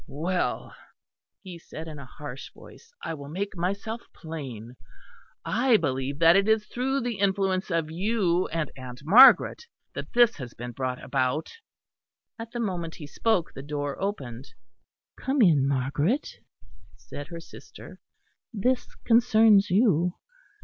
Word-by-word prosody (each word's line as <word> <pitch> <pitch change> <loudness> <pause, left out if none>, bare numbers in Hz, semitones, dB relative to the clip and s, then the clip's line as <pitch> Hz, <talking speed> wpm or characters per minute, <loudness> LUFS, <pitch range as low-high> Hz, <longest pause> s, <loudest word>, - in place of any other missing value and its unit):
"Well," 175 +6 -2 0.7
he 180 -3 -9
said, 160 0 -9
in 155 -2 -8
a 135 - -10
harsh 140 -1 -9
voice, 465 - -16
"I - - -3
will 140 -2 -9
make 195 +5 -4
myself 200 +6 -3
plain. 130 -8 -8 0.7
I 240 0 +3
believe 135 -4 -2
that 165 +2 +6
it 195 +1 +3
is 220 -1 +2
through 265 +5 -1
the 235 -4 -3
influence 195 -1 0
of 165 -3 -1
you 185 -1 +1
and 155 -2 -3
Aunt 130 0 -9
Margaret 255 - +7 0.3
that - - -7
this 240 -1 +4
has 125 -5 -8
been 120 +1 -7
brought 125 +1 -3
about." 135 +3 -1 0.9
At 230 0 -7
the 240 - -6
moment 175 -7 -3
he 150 - -9
spoke 180 +3 0
the 135 - -8
door 145 +1 -4
opened. 135 - -4 0.7
"Come 270 +2 -1
in, 155 - +5
Margaret," 145 - 0 0.7
said 145 0 -9
her 170 -1 -8
sister, 165 - -13 0.5
"this 250 +4 -1
concerns 220 -3 +5
you." 180 -4 +2
170 Hz, 140 wpm, -26 LUFS, 145-215 Hz, 0.9 s, Margaret